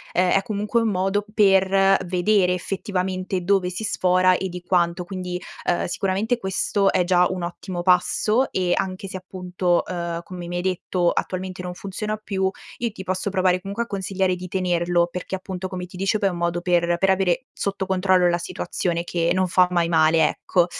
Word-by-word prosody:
uhm, 180 - +4
è 195 - +4
comunque 215 +1 -1
un 225 - +1
modo 195 +1 0
per 195 -2 +4
vedere 180 +1 +2
effettivamente 185 0 -2
dove 195 -1 +2
si 185 +5 -4
sfora 185 -2 +3
e 190 +1 -3
di 180 0 -7
quanto, 175 -1 +1
quindi, 180 -1 -5 0.3
uhm, 175 - +1
sicuramente 200 +6 0
questo 195 0 +1
è 180 - +2
già 180 0 +4
un 180 -2 -4
ottimo 175 0 -5
passo. 210 +7 +2
E 180 -2 +1
anche 190 0 -3
se 190 - -8
appunto, 180 -1 -1
uhm, 170 -1 -4
come 180 -2 -8
mi 175 0 -3
hai - - -1
detto 180 -1 0
attualmente 185 0 -3
non 180 0 -5
funziona 210 +2 -4
più, 190 -3 -1 0.3
io 235 -1 -1
ti 190 - -8
posso 185 +2 -2
provare 185 -2 +2
comunque 200 +5 -3
a 235 - -12
consigliare 190 -2 -1
di 180 0 -7
tenerlo, 175 -2 +1
perché 180 +2 -4
appunto 185 -1 -5
come 180 -1 -5
ti 180 0 -12
dicevo 195 +3 +1
è 200 - +3
un 175 - -5
modo 170 0 -1
per 175 -1 +2
per 190 +2 +2
avere 190 +6 +1
sotto 200 -1 -2
controllo 185 -1 +3
la 175 0 +1
situazione, 170 0 -2
che 170 -1 -1
non 185 0 +2
fa 180 0 +4
mai 175 -2 +1
male, 160 -1 +4
ecco. 175 -2 +1
185 Hz, 190 wpm, -23 LUFS, 175-195 Hz, 0.3 s, uhm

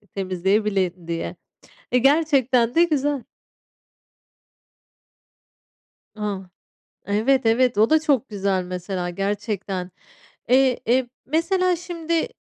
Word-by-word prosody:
temizleyebilin 190 -1 0
diye. 170 0 -4 0.6
Eee, 250 - +5
gerçekten 270 -4 +3
de 340 +1 +6
güzel. 290 -4 0 2.9
A, 210 -2 -3 0.7
Evet, 230 +5 +2
evet, 235 -1 +3
o 220 +5 +4
da 315 - +5
çok 280 -5 +1
güzel 195 -3 -1
mesela 180 0 -4
gerçekten. 195 -1 -3 0.6
Eee, 260 0 +4
e, 245 +1 +2 0.2
mesela, 355 +4 +1
şimdi 335 -1 -2
230 Hz, 90 wpm, -23 LUFS, 195-285 Hz, 2.9 s, de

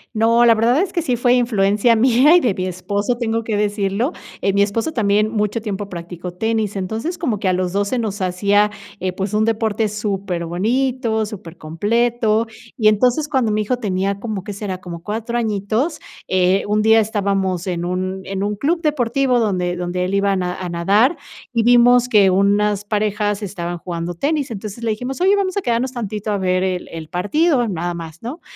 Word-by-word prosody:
No, 230 +2 +4
la 230 -1 +6
verdad 240 +8 +3
es 380 - -1
que 345 - -1
sí 265 -6 0
fue 245 +1 +3
influencia 220 -1 +2
mía 255 +7 +5
y 355 - +5
de 240 -8 +1
mi 185 0 -3
esposo, 200 +6 -2
tengo 230 -1 -1
que 220 - -1
decirlo. 205 - 0 0.3
Eh, 195 - +2
mi 200 +1 +2
esposo 215 +9 0
también 210 -4 +2
mucho 210 +1 -1
tiempo 205 -2 -4
practicó 175 0 -7
tenis, 220 +1 -1
entonces 220 - -3
como 250 - -1
que 195 - -1
a 185 - +3
los 180 0 -1
2 200 +1 0
se 255 - -1
nos 215 -3 -3
hacía, 200 +3 +2 0.3
eh, 185 0 -2
pues, 195 +2 -4
un 215 +1 +2
deporte 220 -1 0
súper 200 -4 -3
bonito, 225 +5 0
súper 185 -6 -9
completo, 220 +7 0 0.3
y 215 -2 +4
entonces 250 +8 +2
cuando 255 -7 +1
mi 215 - +1
hijo 245 +4 -1
tenía 195 -3 -1
como, 210 -3 -4
¿qué 205 - -6
será?, 200 -2 -5
como 170 -2 -8
4 225 +5 -3
añitos, 220 - -1 0.3
eh, 185 +1 +2
un 210 +1 +1
día 220 +1 +5
estábamos 195 -4 -1
en 175 -1 -2
un 185 +1 -3
en 195 0 -3
un 205 +1 -1
club 330 - 0
deportivo 270 -3 +1
donde 180 -5 0
donde 180 +1 -2
él 185 +2 -2
iba 200 0 +2
a - - +1
na 180 -1 -2
a 185 - -4
nadar 200 - +2 0.4
y 230 -1 +2
vimos 245 +1 +5
que 205 -4 +5
unas 200 +2 +2
parejas 210 0 -1
estaban 175 -3 -4
jugando 170 0 -5
tenis. 285 - -1
Entonces, 215 +2 -7
le 230 - 0
dijimos: 250 +8 -4
"oye, 385 +2 +5
vamos 375 -2 -1
a 400 - 0
quedarnos 245 -2 -1
tantito 215 -3 -4
a 205 - 0
ver 185 -1 +1
el 185 -1 -2
el 160 -1 -7
partido, 245 - +1
nada 175 -1 -2
más," 165 -1 -8
¿no? 260 +9 -6
210 Hz, 200 wpm, -19 LUFS, 190-235 Hz, 0.4 s, la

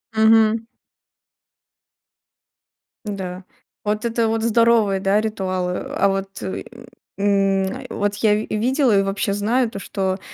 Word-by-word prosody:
Мгм. 220 0 +4 2.4
Да. 190 -3 -5 0.4
Вот 210 +2 -1
это 230 0 +1
вот 225 0 -1
здоровые, 230 -3 +3
да, 195 +2 +2
ритуалы. 185 -4 -2 0.2
А 200 - +3
вот, 195 0 -2
э, 190 - -4 0.5
м, 195 -1 +2
э, - - -10
вот 205 0 -1
я 210 0 +3
ви 215 - -3
видела 245 +1 +2
и - - +4
вообще 195 0 -1
знаю 225 +5 +1
то, 200 - -7
что 190 0 -2
205 Hz, 130 wpm, -21 LUFS, 195-225 Hz, 2.4 s, Мгм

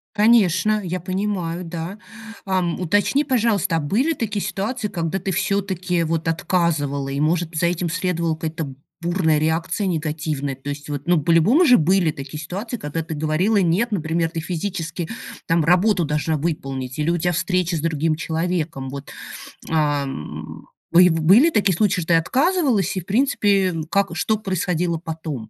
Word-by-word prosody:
Конечно, 210 -2 +4
я 180 +1 -3
понимаю, 185 -2 -2
да. 170 +4 -6 0.5
А, 190 -1 +1
уточни, 200 - +1
пожалуйста: 210 -8 +1
а 160 - +1
были 235 - +1
такие 215 -7 -3
ситуации, 215 +3 -3
когда 175 -1 -2
ты 195 - -3
всё-таки, 185 -2 0
вот, 165 0 -1
отказывала 155 -6 0
и, 140 +1 -3
может, 165 +2 0
за 170 - +2
этим 175 0 -1
следовала 170 -2 -1
какая-то 160 -3 -5 0.3
бурная 170 -3 +1
реакция 160 +6 0
негативная? 155 -4 -2
То 135 +2 -10
есть, 145 +1 -6 0.2
ну, 175 -2 +4
по-любому 175 - +4
же 250 -5 +6
были 175 +1 +3
такие 140 0 -8
ситуации, 205 - -5
когда 165 -4 -4
ты 160 0 -6
говорила 160 +8 +1
"нет", 195 +5 +2
например, 165 -3 0
ты 165 - -4
физически 170 0 -4 0.4
там 165 -1 +2
работу 180 +2 +3
должна 150 +1 0
выполнить, 135 -5 -4
или 150 +2 0
у 170 - +2
тебя 175 +1 0
встреча 180 0 0
с 155 - -2
другим 160 0 0
человеком. 160 -4 -2
Вот. 140 0 -8 0.6
А, 150 -3 +1
м, 135 - -7 0.2
б 180 +1 +7
были 185 - +5
такие 200 - +2
случаи, 200 0 +1
что 165 - -7
ты - - +5
отказывалась, 255 - +1
и, - - -1
в 175 - -17
принципе, 200 -5 +2 0.2
как 200 0 +1
что 220 +4 +1
происходило 180 -4 -1
потом? 155 -8 -6
170 Hz, 160 wpm, -21 LUFS, 160-195 Hz, 0.6 s, б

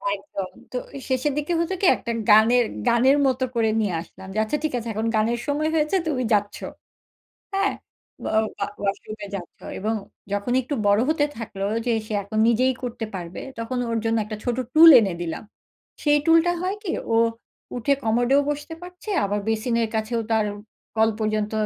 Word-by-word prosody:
একদম। 195 -1 -6 0.2
তো 255 - -3 0.2
এ - - -6
শেষের 260 +2 +1
দিকে 300 +4 -1
হতো 335 +3 0
কি? 390 - +2
একটা 235 - -5 0.2
গানের 225 +3 +6 0.2
গানের 260 +4 +4
মতো 260 0 0
করে 225 -1 +2
নিয়ে 205 -4 0
আসলাম। 190 +2 -13
যে - - -5
আচ্ছা 220 +7 -1
ঠিক 310 - -1
আছে 235 -1 -5
এখন 220 +2 -1
গানের 230 +2 +1
সময় 300 +2 0
হয়েছে, 305 +3 +1
তুমি 265 -5 0
যাচ্ছো। 205 -1 0 0.9
হ্যাঁ? 395 +1 +1 0.5
ওয়া - - -2 0.3
ওয়া - - +2
ওয়াশরুমে 205 +1 -4
যাচ্ছো 175 -3 -9
এবং 215 +3 -1 0.4
যখন 205 +4 -1
একটু 270 +4 -4
বড় 205 +1 +4
হতে 310 -2 +2
থাকলো 200 -4 -5 0.2
যে 240 - +1 0.2
সে 215 - -5
এখন 215 +2 -3
নিজেই 255 +3 +3
করতে 235 -2 -4
পারবে, 175 -1 -6 0.2
তখন 230 +2 -3
ওর 230 - 0
জন্য 225 0 +2
একটা 215 0 -6
ছোট 245 -1 -1 0.2
টুল 330 +1 +10
এনে 195 -5 0
দিলাম। 165 -2 -4 0.6
সেই 295 -1 +4
টুলটা 330 +1 +5
হয় 370 +2 -1
কি? 355 - -2 0.2
ও - - +4 0.6
উঠে 250 +4 +2
কমোডেও 245 +5 +3
বসতে 295 +2 -4
পারছে 360 +4 -10 0.2
আবার 205 +1 -1
বেসিনের 230 +1 +1
কাছেও 220 +2 -1
তার 220 -1 +3 0.5
কল 220 0 +4
পর্যন্ত 215 -1 -1
230 Hz, 175 wpm, -24 LUFS, 215-285 Hz, 0.9 s, টুল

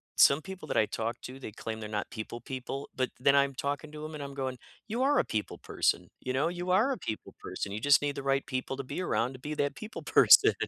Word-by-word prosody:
Some 140 +3 +6
people 190 +1 -8
that - - 0
I 110 - +5
talk 115 +2 -3
to, 130 +1 -7
they 110 - -7
claim 110 +1 -5
they're 105 - -5
not 105 -1 -2
people 120 0 -6
people, 130 +2 -5
but 130 -1 0
then 140 +2 +5
I'm 140 -1 +4
talking 145 +3 -3
to 155 0 -7
'em 155 - -7
and 145 -2 -5
I'm 140 - -7
going, 130 -2 -3 0.3
"You 235 +4 -2
are 290 +1 +4
a - - +2
people 105 -1 -3
person. - - 0
You 130 - -3
know, 135 +5 +2
you 175 +1 -2
are 220 +9 +4
a - - -5
people 110 - -6
person. 95 +2 -4
You 105 - -3
just 145 +1 +6
need 145 -1 -1
the 140 - -5
right 135 0 +1
people 130 0 -3
to 140 - -3
be 145 +7 -4
around 125 -7 0
to 130 - -10
be 150 +3 -4
that 145 -1 0
people 215 0 -7
person. - - +7
140 Hz, 265 wpm, -30 LUFS, 125-150 Hz, 0.3 s, person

